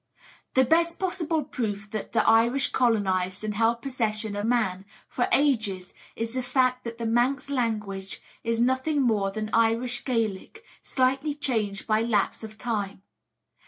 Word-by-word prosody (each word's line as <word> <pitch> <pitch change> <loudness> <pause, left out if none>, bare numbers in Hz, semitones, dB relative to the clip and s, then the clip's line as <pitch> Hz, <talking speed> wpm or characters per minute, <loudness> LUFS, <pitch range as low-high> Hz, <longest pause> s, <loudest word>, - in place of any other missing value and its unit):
The 260 0 +5
best 335 +5 +2
possible 335 -4 -1
proof 215 -6 -4
that 215 - -4
the - - +2
Irish 235 +4 +4
colonised 190 -5 +1
and 215 -1 -2
held 230 +2 +1
possession 220 -5 -2
of 205 +2 -2
Man 205 -6 +1 0.2
for 245 - -1
ages 215 -10 +1 0.2
is 230 0 -4
the 255 - -1
fact 255 0 +1
that 230 0 -5
the 235 - -4
Manx 245 +5 +1
language 210 -7 -2 0.2
is 230 0 0
nothing 260 +5 +1
more 210 -5 +2
than 215 +2 -4
Irish 230 +2 +2
Gaelic, 230 - -2 0.2
slightly 270 +3 0
changed 220 -9 -2
by 215 0 +2
lapse 225 -2 0
of 215 0 -9
time. 205 -5 -3
230 Hz, 150 wpm, -26 LUFS, 215-255 Hz, 0.2 s, The